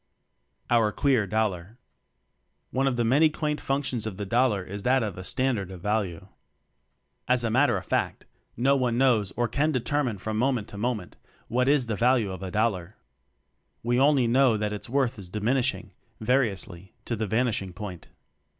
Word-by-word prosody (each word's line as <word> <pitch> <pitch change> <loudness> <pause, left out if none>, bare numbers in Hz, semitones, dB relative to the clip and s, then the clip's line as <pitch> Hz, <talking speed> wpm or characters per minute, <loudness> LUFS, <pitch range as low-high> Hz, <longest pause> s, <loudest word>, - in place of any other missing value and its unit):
Our 115 -3 +4
Queer 125 -4 +2
Dollar. 105 -1 -2 0.9
One 135 +1 +1
of 130 - +1
the 120 - +2
many 140 +7 +4
quaint 150 -1 -2
functions 135 -5 -1
of 100 -4 -6
the 105 - -4
dollar 115 -2 +2
is 100 +2 -7
that 130 +3 +2
of 105 -5 -3
a 90 - -7
"standard 120 -4 -1
of 95 -2 -9
value." 100 -4 -1 1.0
As 125 -1 +3
a 115 - 0
matter 140 +5 +3
of - - -7
fact, - - -1 0.3
no 135 +4 +3
one 125 -3 0
knows 120 -7 +3
or 120 0 0
can 145 +7 +1
determine 130 -3 -1
from 110 +3 -4
moment 125 -4 0
to 100 - -9
moment, 110 -5 -3 0.3
what 125 +2 +1
is 145 -3 +3
the 115 -2 -2
value 120 -2 +2
of 95 -1 -7
a 95 - -4
dollar. 105 -2 -1 0.9
We 120 +2 +1
only 140 -2 +4
know 125 -1 +4
that 105 0 -2
its 105 - -6
worth 130 -3 0
is 95 -3 -9
diminishing, 120 +6 -1 0.3
vari 125 +2 +2
ously, 95 -1 -8
to 120 - -2
the 110 0 -2
vanishing 110 -4 0
point. 90 -2 -8
115 Hz, 175 wpm, -26 LUFS, 105-130 Hz, 1.0 s, Our